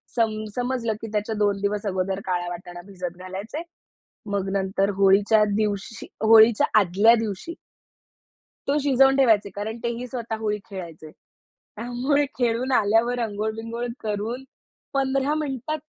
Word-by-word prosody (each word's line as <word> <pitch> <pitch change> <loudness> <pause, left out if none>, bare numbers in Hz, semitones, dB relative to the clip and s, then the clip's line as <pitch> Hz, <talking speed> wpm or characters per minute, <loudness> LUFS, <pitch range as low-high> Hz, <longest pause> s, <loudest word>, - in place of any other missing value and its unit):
सम 220 -2 +1
समजलं 245 -2 -1
की 225 - -5
त्याच्या 215 +1 -1
2 205 -1 +2
दिवस 205 +1 -1
अगोदर 190 0 -1
काळा 180 -1 -1
वाटाणा 175 0 -8
भिजत 180 -3 -6
घालायचे. 195 - -6 0.7
मग 195 -1 -1
नंतर 195 0 0
होळीच्या 200 +2 +5
दिवशी 210 +1 -2 0.2
होळीच्या 220 0 +6
आदल्या 205 +4 +5
दिवशी 215 - -6 1.1
तो 280 - +2
शिजवून 270 -1 +4
ठेवायचे 220 -7 +4
कारण 210 +4 -5
तेही 235 +1 -3
स्वतः 235 -3 -4
होळी 210 -1 -1
खेळायचे. 170 -6 -9
त्यामुळे 245 - -3
खेळून 245 +1 0
आल्यावर 230 +2 +2
अंघोळ 215 -1 -2
बिंघोळ 230 +2 -4 0.2
करून 220 +5 -3 0.5
15 275 +1 +1
मिनिटात 305 0 -3
220 Hz, 130 wpm, -24 LUFS, 200-245 Hz, 1.1 s, होळीच्या